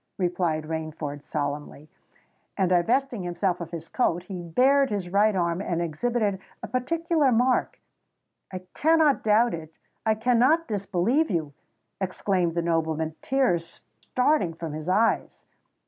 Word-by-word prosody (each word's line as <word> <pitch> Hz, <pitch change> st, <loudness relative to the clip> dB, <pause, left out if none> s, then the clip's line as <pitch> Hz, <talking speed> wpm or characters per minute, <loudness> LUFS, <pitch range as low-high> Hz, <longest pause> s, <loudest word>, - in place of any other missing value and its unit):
replied 175 Hz, -4 st, 0 dB
Rainford 155 Hz, -2 st, -5 dB
solemnly; 145 Hz, 0 st, -4 dB, 0.7 s
and 190 Hz, -3 st, +2 dB
divesting 235 Hz, +6 st, +1 dB
himself 175 Hz, 0 st, -1 dB
of 170 Hz, -, -5 dB
his 170 Hz, -2 st, -7 dB
coat, 175 Hz, -9 st, 0 dB
he 185 Hz, -1 st, -7 dB
bared 265 Hz, +11 st, +3 dB
his 200 Hz, -4 st, -3 dB
right 205 Hz, +2 st, +3 dB
arm 170 Hz, 0 st, 0 dB
and 170 Hz, -3 st, -2 dB
exhibited 200 Hz, +5 st, -1 dB, 0.2 s
a -, -, -4 dB
particular 315 Hz, +2 st, +1 dB
mark. 250 Hz, +2 st, +1 dB, 0.7 s
"I 185 Hz, -1 st, -6 dB
cannot 315 Hz, -2 st, +3 dB
doubt 220 Hz, +3 st, +3 dB
it—I 165 Hz, +7 st, -4 dB
cannot 250 Hz, +8 st, +3 dB
disbelieve 205 Hz, -, 0 dB
you!" 155 Hz, -6 st, -2 dB, 0.5 s
exclaimed 185 Hz, -2 st, -1 dB
the 170 Hz, -, 0 dB
nobleman, 160 Hz, -1 st, -1 dB
tears 180 Hz, -12 st, 0 dB, 0.2 s
starting 250 Hz, -, +1 dB
from 165 Hz, -2 st, -6 dB
his 155 Hz, +3 st, -5 dB
eyes. 220 Hz, +5 st, +1 dB
185 Hz, 130 wpm, -26 LUFS, 165-245 Hz, 0.7 s, bared